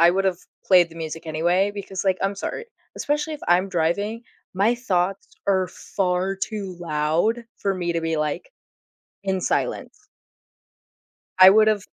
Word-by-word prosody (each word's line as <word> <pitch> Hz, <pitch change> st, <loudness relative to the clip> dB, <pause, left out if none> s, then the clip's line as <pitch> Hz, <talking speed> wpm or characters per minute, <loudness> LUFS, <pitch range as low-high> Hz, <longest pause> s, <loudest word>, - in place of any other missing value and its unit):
I 170 Hz, +1 st, +7 dB
would've 190 Hz, -1 st, 0 dB, 0.3 s
played 180 Hz, -3 st, +5 dB
the 165 Hz, -, -14 dB
music 160 Hz, 0 st, -6 dB
anyway, 175 Hz, +5 st, +1 dB
because, 195 Hz, -1 st, -5 dB
like, 190 Hz, -1 st, +2 dB
I'm 195 Hz, +1 st, 0 dB
sorry, 460 Hz, -, -5 dB, 0.3 s
especially 295 Hz, +2 st, -1 dB
if 295 Hz, -, -10 dB
I'm 180 Hz, +2 st, +3 dB
driving, 200 Hz, +7 st, -1 dB, 0.3 s
my 205 Hz, +6 st, +3 dB
thoughts 195 Hz, -5 st, -1 dB, 0.2 s
are 190 Hz, -2 st, +2 dB
far 185 Hz, 0 st, -1 dB
too 195 Hz, -1 st, -4 dB
loud 165 Hz, +9 st, 0 dB
for 195 Hz, -, -1 dB
me 175 Hz, -2 st, -2 dB
to 170 Hz, -, -1 dB
be, 165 Hz, 0 st, -1 dB
like, 155 Hz, -, -3 dB, 0.7 s
in 190 Hz, -1 st, -1 dB
silence. -, -, -2 dB, 1.3 s
I 185 Hz, 0 st, +11 dB
would've 215 Hz, -1 st, +4 dB
190 Hz, 145 wpm, -23 LUFS, 175-200 Hz, 1.3 s, I